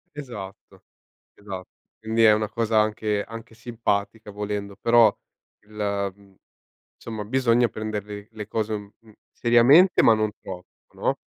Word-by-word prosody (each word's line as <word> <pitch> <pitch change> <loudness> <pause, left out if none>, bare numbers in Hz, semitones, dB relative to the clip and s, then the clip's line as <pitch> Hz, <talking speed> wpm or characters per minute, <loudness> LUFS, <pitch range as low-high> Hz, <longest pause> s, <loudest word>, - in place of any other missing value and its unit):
Esatto, 105 -10 -9 0.5
esa 95 -3 -8 0.4
quindi 110 +1 0
è 110 -1 +8
una 105 0 -1
cosa 115 0 +1
anche 105 -1 0
anche 115 0 -10
simpatica 110 -2 -3
volendo, 100 -1 -4
però 115 -2 +4 0.5
il 105 - -20 0.4
mhmm, 100 -1 -22 0.6
insomma 110 -2 -6
bisogna 120 +1 +2
prendere 105 -1 -6
l 110 - -28
le 105 -1 -6
cose 110 0 -2
un 105 -1 -5 0.4
seriamente 130 +10 +5
ma 115 - +6
non 110 -1 0
troppo, 90 -2 -9 0.3
no, - - -1
110 Hz, 135 wpm, -24 LUFS, 105-115 Hz, 0.6 s, è